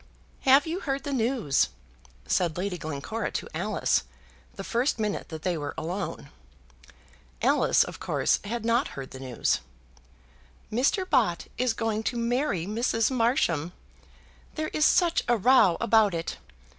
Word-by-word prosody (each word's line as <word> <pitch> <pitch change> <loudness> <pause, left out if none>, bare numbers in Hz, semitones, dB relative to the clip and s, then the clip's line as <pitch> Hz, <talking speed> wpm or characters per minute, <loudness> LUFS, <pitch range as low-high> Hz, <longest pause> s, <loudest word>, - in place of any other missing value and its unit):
"Have 275 +2 +6
you 335 +3 -3
heard 275 -5 -3
the 285 - -3
news?" 235 - +1 0.6
said 175 -3 0
Lady 185 +1 -2
Glencora 160 +10 -4
to - - -3
Alice, - - 0 0.5
the - - -6
first 245 +4 0
minute 210 -2 -2
that 160 -2 -7
they 180 -2 0
were 145 -1 -5
alone. 175 +4 -4 1.1
Alice, - - +3
of - - -8
course, - - +1
had 225 +2 -4
not 235 +3 +2
heard 135 -1 -7
the 130 - -9
news. 130 -2 0 1.1
"Mr. 275 - +1
Bott 235 - +2
is 250 -2 +2
going 225 -2 -1
to 240 +2 -2
marry 235 - 0
Mrs. 225 +3 0
Marsham. 205 - +1 0.8
There 310 0 -2
is 305 - +1
such 345 -2 +3
a 240 -1 +3
row 210 -5 +5
about 220 -5 +3
it. 165 0 -4
225 Hz, 145 wpm, -27 LUFS, 175-260 Hz, 1.1 s, Have